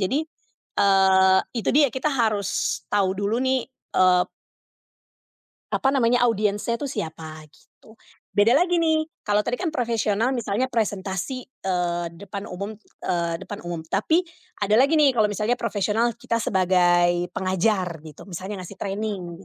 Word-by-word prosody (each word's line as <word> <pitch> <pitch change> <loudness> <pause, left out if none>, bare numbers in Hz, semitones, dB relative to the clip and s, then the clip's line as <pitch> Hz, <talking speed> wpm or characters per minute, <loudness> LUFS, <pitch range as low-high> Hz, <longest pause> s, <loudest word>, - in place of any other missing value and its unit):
jadi, 265 +12 0 0.5
eee, 190 -1 +5 0.2
itu 230 - -2
dia 290 0 +5
kita 265 +3 0
harus 220 -6 0
tahu 195 -2 +2
dulu 205 +4 -1
nih, 260 0 +1 0.3
eee 185 -1 +5 1.5
apa 270 0 +2
namanya, 245 -2 +3
audiensnya 215 0 0
tuh 285 - -3
siapa, 160 -7 -6
gitu. 220 - -22 0.4
Beda 225 +5 +4
lagi 355 +1 +2
nih, 315 -1 +2 0.2
kalau 210 0 +1
tadi 245 +1 -2
kan 360 - 0
profesional 230 -4 0
misalnya 235 -1 -1
presentasi, 205 +3 -2
eee, 175 -7 -2
depan 200 +2 -7
umum, 200 +4 -5 0.3
eee, 170 -1 0
depan 205 +2 -7
umum. 170 -2 -4
Tapi 315 - +1 0.4
ada 210 +1 +2
lagi 280 +4 +4
nih 295 -3 +6
kalau 220 -4 +3
misalnya 210 +4 -1
profesional 225 +1 0
kita 235 -1 -2
sebagai 175 -3 +2
pengajar 185 -2 0
gitu, 155 -1 -12
misalnya 190 +1 -6
ngasih 190 +2 -11
training, 195 -3 -4
205 Hz, 140 wpm, -24 LUFS, 185-240 Hz, 1.5 s, nih